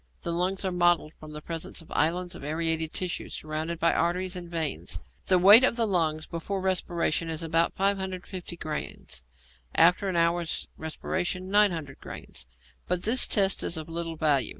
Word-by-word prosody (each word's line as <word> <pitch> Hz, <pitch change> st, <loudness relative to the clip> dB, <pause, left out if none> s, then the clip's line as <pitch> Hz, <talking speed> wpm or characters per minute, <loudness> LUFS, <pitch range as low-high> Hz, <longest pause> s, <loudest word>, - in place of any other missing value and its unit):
The 170 Hz, -, -3 dB
lungs 185 Hz, +3 st, -1 dB
are 190 Hz, -, 0 dB
mottled 175 Hz, -3 st, +2 dB
from 155 Hz, -, -10 dB
the 150 Hz, 0 st, -8 dB
presence 165 Hz, -1 st, -5 dB
of 165 Hz, -, -13 dB
islands 175 Hz, +3 st, 0 dB
of 170 Hz, -, -10 dB
aerated 160 Hz, +1 st, -1 dB
tissue, 180 Hz, -1 st, -2 dB
surrounded 155 Hz, +2 st, -4 dB
by 170 Hz, 0 st, +3 dB
arteries 180 Hz, +2 st, 0 dB
and 175 Hz, -1 st, -7 dB
veins. 155 Hz, -, -2 dB, 0.3 s
The 185 Hz, -, +4 dB
weight 205 Hz, +7 st, +9 dB
of 255 Hz, -, +3 dB
the 230 Hz, -1 st, +1 dB
lungs 160 Hz, -6 st, 0 dB
before 180 Hz, +4 st, -4 dB
respiration 175 Hz, -3 st, 0 dB
is 160 Hz, 0 st, -2 dB
about 165 Hz, +1 st, +1 dB
550 190 Hz, -2 st, -2 dB
grains, 150 Hz, -, -5 dB, 0.5 s
after 180 Hz, +4 st, +4 dB
an 185 Hz, -, -2 dB
hour's 170 Hz, 0 st, +1 dB
respiration 180 Hz, +3 st, -3 dB
900 170 Hz, -10 st, +2 dB
grains; 65 Hz, -1 st, -9 dB, 0.4 s
but 180 Hz, -1 st, -1 dB
this 245 Hz, +4 st, +4 dB
test 195 Hz, -3 st, +3 dB
is 170 Hz, -, -2 dB
of 155 Hz, 0 st, -6 dB
little 165 Hz, 0 st, -4 dB
value. 150 Hz, -4 st, +2 dB
170 Hz, 170 wpm, -27 LUFS, 160-185 Hz, 0.5 s, weight